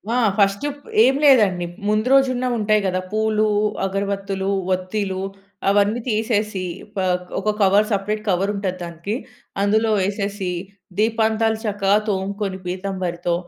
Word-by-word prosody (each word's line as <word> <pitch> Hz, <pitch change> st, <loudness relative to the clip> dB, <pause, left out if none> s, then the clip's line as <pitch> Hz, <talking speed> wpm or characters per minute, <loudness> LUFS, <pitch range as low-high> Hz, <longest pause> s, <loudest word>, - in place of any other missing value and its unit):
ఆ! -, -, +2 dB, 0.2 s
ఫస్ట్ 200 Hz, +5 st, +2 dB
ప్ -, -, -17 dB, 0.3 s
ఏం 265 Hz, +1 st, +4 dB
లేదండి. 210 Hz, -11 st, +5 dB, 0.2 s
ముందు 215 Hz, +2 st, +1 dB
రోజున్న 255 Hz, -2 st, +3 dB
ఉంటాయి 215 Hz, -1 st, +2 dB
గదా 185 Hz, -1 st, 0 dB
పూలు, 215 Hz, 0 st, +1 dB, 0.4 s
అగరవత్తులు, 195 Hz, 0 st, -2 dB, 0.2 s
వత్తీలు 190 Hz, +1 st, -2 dB, 0.5 s
అవన్నీ 205 Hz, +3 st, +3 dB
తీసేసి 215 Hz, -3 st, 0 dB, 0.3 s
పాక్ 180 Hz, -1 st, -1 dB
ఒక 215 Hz, -, 0 dB
కవర్ 200 Hz, +2 st, +4 dB
సెపరేట్ 210 Hz, +1 st, -1 dB
కవర్ 195 Hz, +2 st, +1 dB
ఉంటది 190 Hz, -2 st, -2 dB
దానికి. 170 Hz, +5 st, -4 dB, 0.5 s
అందులో 220 Hz, +2 st, +2 dB
ఏసేసి 200 Hz, -1 st, -2 dB, 0.5 s
దీపాంతాలు 220 Hz, 0 st, +2 dB
చక్కగా 205 Hz, -1 st, +2 dB
తోముకొని 195 Hz, 0 st, -2 dB
పీతంభరితో, 180 Hz, -2 st, -2 dB
200 Hz, 120 wpm, -21 LUFS, 190-215 Hz, 0.5 s, లేదండి